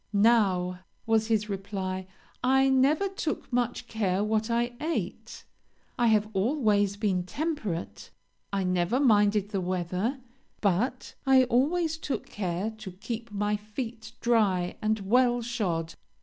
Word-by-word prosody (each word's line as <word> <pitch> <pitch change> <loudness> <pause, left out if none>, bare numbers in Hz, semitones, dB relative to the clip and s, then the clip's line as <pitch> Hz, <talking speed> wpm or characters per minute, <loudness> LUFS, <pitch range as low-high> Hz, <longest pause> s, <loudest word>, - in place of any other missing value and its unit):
'Now,' 200 -4 +3 0.3
was 220 -1 +2
his 215 -2 +1
reply, 190 -2 -4 0.4
'I 265 +1 +4
never 275 +8 +3
took 355 -9 -4
much 245 -1 -1
care 200 -3 0
what 215 +1 0
I 240 +1 0
ate; 320 +2 -4 0.5
I 240 - +2
have 215 -1 +3
always 205 -2 +2
been 200 -4 +1
temperate. 220 - -4 0.4
I 195 -1 0
never 180 +6 +1
minded 210 -5 +3
the 200 -3 -2
weather; 185 +8 -2 0.4
but 215 +6 0
I 265 -1 +7
always 310 +7 +1
took 290 - -3
care 190 +1 -3
to 195 -4 -8
keep 225 +4 -6
my 210 0 0
feet 220 +2 -6
dry 200 -7 +2
and 215 0 0
well 240 +4 +3
shod.' 180 -9 -2
215 Hz, 130 wpm, -28 LUFS, 195-245 Hz, 0.5 s, I